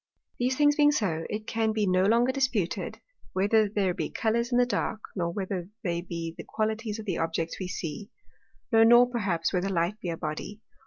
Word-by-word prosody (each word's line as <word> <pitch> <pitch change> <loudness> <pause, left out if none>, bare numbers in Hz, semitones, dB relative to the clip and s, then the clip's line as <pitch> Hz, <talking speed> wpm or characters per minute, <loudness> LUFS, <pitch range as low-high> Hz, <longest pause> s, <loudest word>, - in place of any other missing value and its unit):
These 255 +1 +1
things 290 -1 +4
being 295 -1 +6
so, 175 - -1
it 215 +1 -4
can 225 -1 0
be 215 -1 +1
no 185 0 +3
longer 235 +4 +4
disputed, 260 -9 -1 0.4
whether 205 +2 +3
there 195 -3 0
be 190 - -3
Colours 235 +2 0
in 245 - +3
the 245 - +5
dark, 235 -2 -2 0.2
nor 170 -3 -1
whether 185 -1 -4
they 170 -3 -1
be 170 -2 -5
the - - -8
Qualities 220 0 -2
of 220 - -7
the 185 -5 -2
Objects 165 0 -2
we 185 - -3
see, 180 +2 -5 0.6
no 225 -1 +6
nor 240 +2 +7
perhaps, 190 -8 -1
whether 185 +1 0
Light 180 +3 0
be 180 - -4
a 165 - -3
Body. 160 +7 -5
205 Hz, 200 wpm, -28 LUFS, 175-230 Hz, 0.6 s, nor